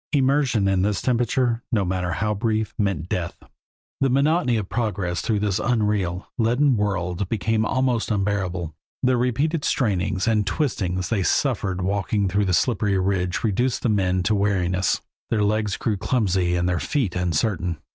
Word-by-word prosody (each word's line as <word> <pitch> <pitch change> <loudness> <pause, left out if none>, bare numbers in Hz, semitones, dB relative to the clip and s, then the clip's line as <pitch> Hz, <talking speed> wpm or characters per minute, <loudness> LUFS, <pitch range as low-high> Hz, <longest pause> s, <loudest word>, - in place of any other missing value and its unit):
Immersion 135 -6 +2
in 95 -1 +2
this 100 +1 0
temperature, 120 -1 +1
no 105 -5 +1
matter 90 -1 -1
how 105 +3 0
brief, 110 0 -1
meant 95 -6 -1
death. 90 -4 -3 0.6
The 135 - +2
monotony 140 -1 +2
of 105 -3 -3
progress 100 -7 -2
through 105 -3 0
this 100 -2 0
unreal, 105 -6 0
leaden 125 +4 +3
world 95 -2 -1
became 110 0 0
almost 130 -3 0
unbearable. 95 -5 -1 0.3
The 130 0 +3
repeated 140 +6 0
strainings 95 -4 0
and 105 -3 +2
twistings 95 - -1
they 110 -4 +1
suffered 95 -4 0
in - - -2
walking 100 +1 0
the 100 0 +1
slippery 100 +3 +1
ridge 95 -1 0
reduced 120 +3 0
the 120 - +2
men 95 -3 +1
to 110 - +1
weariness; 95 -2 +1 0.3
their 110 -2 +1
legs 105 -1 0
grew 110 -3 -1
clumsy 95 -5 +1
and 90 0 0
their 90 -1 0
feet 125 - -1
uncertain. 90 0 0
105 Hz, 155 wpm, -23 LUFS, 95-115 Hz, 0.6 s, leaden